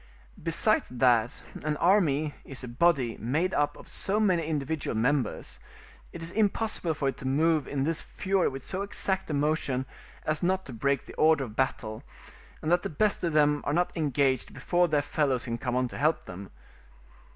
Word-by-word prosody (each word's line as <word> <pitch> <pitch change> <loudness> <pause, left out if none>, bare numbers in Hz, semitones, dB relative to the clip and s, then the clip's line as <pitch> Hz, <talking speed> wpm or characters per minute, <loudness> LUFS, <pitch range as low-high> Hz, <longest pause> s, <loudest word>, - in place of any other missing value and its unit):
Besides - - +3
that 120 -1 +2 0.2
an 150 0 -1
army 155 -5 +3
is 135 -1 -5
a - - -5
body 130 -2 +2
made 155 - 0
up 145 0 0
of - - -13
so 205 +2 0
many 180 -7 +2
individual 150 -5 -2
members, 125 0 -1 0.5
it 170 - -8
is 165 - -1
impossible 210 -5 0
for 140 -2 0
it - - -6
to 130 - -5
move 155 +2 +2
in 135 -2 -1
this 165 +2 0
fury 190 -1 0
with 135 -1 -5
so 190 - -2
exact 195 -2 -1
a - - -1
motion 140 -3 0 0.4
as 155 0 0
not 190 +1 0
to 130 - -8
break 140 +4 0
the - - -11
order 155 -2 +4
of 110 -4 -8
battle, 110 -4 -2 0.6
and 155 - 0
that 175 0 +4
the - - -4
best 205 +7 +1
of 170 -2 0
them 150 -1 +3
are 145 - -1
not 175 +2 0
engaged 140 -4 0
before 175 0 +2
their 150 -3 +1
fellows 135 -4 0
can 115 -1 -3
come 125 -2 -2
on 125 0 +1
to - - -7
help 155 +3 +2
them. 95 +2 -9
150 Hz, 190 wpm, -28 LUFS, 130-170 Hz, 0.6 s, order